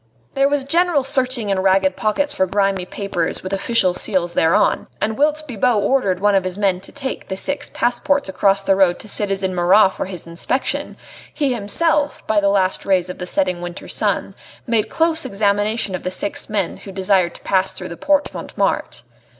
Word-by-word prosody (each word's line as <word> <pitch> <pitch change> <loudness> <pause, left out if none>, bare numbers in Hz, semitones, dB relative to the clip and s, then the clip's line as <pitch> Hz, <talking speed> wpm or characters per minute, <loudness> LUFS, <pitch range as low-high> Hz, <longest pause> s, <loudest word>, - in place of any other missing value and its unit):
There 275 +1 +3
was 285 -1 0
general 330 0 +2
searching 255 -5 0
in 195 - +1
ragged 190 0 +2
pockets 285 +9 0
for 190 -8 +1
grimy 195 -1 0
papers 195 -5 -3
with 185 - -5
official 195 -1 +1
seals 180 -2 0
thereon, 165 +2 +2
and 220 +1 -1
whilst 305 +3 +1
Bibot 245 -1 +1
ordered 200 -7 +1
one 205 +1 +3
of 195 -1 +3
his 185 0 -4
men 195 -3 +1
to 195 - -14
take 275 -2 -6
the 190 - -4
six 285 +7 -3
passports 285 +3 0
across 195 +1 +1
the 195 - +3
road 190 -2 +3
to - - -10
citizen 195 -2 -1
Marat 185 +3 +5
for - - -4
his 185 -3 -8
inspection, 170 +10 -2 0.3
he 280 -4 0
himself, 290 +8 0
by 215 -1 +2
the 200 -1 +2
last 190 -2 +1
rays 185 -2 +1
of - - -11
the 180 - -5
setting 185 -2 0
winter 175 +1 -7
sun, - - -1 0.3
made 230 -3 0
close 330 0 +1
examination 205 +1 0
of 185 - -3
the 185 - -3
six 190 +2 -3
men 200 -5 -1
who 195 - -10
desired 190 -2 +1
to - - -12
pass 190 0 +1
through 185 - -6
the 170 - -7
Porte 290 - +1
Montmartre. - - -2
200 Hz, 190 wpm, -19 LUFS, 185-255 Hz, 0.3 s, Marat